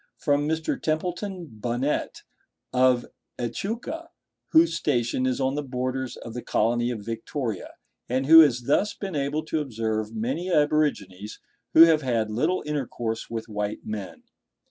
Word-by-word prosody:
From 145 0 +1
Mr. 160 0 -1
Templeton 175 +3 -2
Bunnett, 120 +3 -3 0.5
of 125 -1 +3 0.3
Echuca, 230 - -4 0.4
whose 165 +2 +5
station 130 -5 0
is 130 0 -1
on 135 0 +1
the 145 - -1
borders 130 -1 -3
of 115 - -9
the 120 - -5
colony 120 +2 +1
of 110 -4 -5
Victoria, 115 - -4 0.3
and 130 +2 0
who 165 +3 +10
has 130 -6 +5
thus 170 - +1
been 195 -5 -5
able 145 +2 -1
to 160 - -1
observe 110 -4 -3
many 135 +12 -2
aborigines 145 - 0 0.4
who 160 - +9
have 160 -2 +5
had 115 -5 0
little 155 +12 0
intercourse 120 -6 -3
with 115 -1 -5
white 105 -1 -4
men. 105 -3 -6
130 Hz, 145 wpm, -25 LUFS, 115-155 Hz, 0.5 s, who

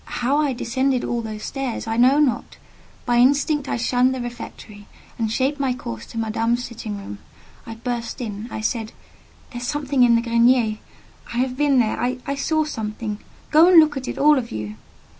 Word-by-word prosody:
How 265 +4 +2
I 290 -3 +1
descended 260 +1 0
all 240 -1 -1
the 220 -1 -6
stairs 265 +2 -4
I 225 0 -2
know 255 +4 +5
not. 265 -6 0 0.5
By 240 0 +2
instinct 285 +3 +3
I - - -1
shunned 250 +2 +2
the - - -4
refectory, 235 -4 -8 0.3
and 220 -2 0
shaped 270 +5 0
my 265 -3 0
course 115 - -7
to - - -10
Madame's 225 +2 0
sitting 220 -3 -6
room: 105 - -8 0.5
I 225 - -6
burst 235 +1 -4
in. 215 -2 -5
I 220 - -5
said— 225 0 -2 0.6
"There 240 - -6
is 245 - -4
something 285 -2 0
in 240 -1 +6
the 230 - +1
grenier; 235 -2 +3 0.5
I 235 - -4
have 255 0 0
been 285 -1 +2
there: 225 -3 +1
I 255 +2 -2
saw 310 +3 0
something. 215 -6 -4 0.3
Go 315 +3 +7
and 360 -2 +8
look 305 -2 +4
at 265 -2 -5
it, - - -4
all 295 0 +5
of 235 -2 -6
you!" 105 -1 -5
245 Hz, 195 wpm, -22 LUFS, 225-270 Hz, 0.6 s, and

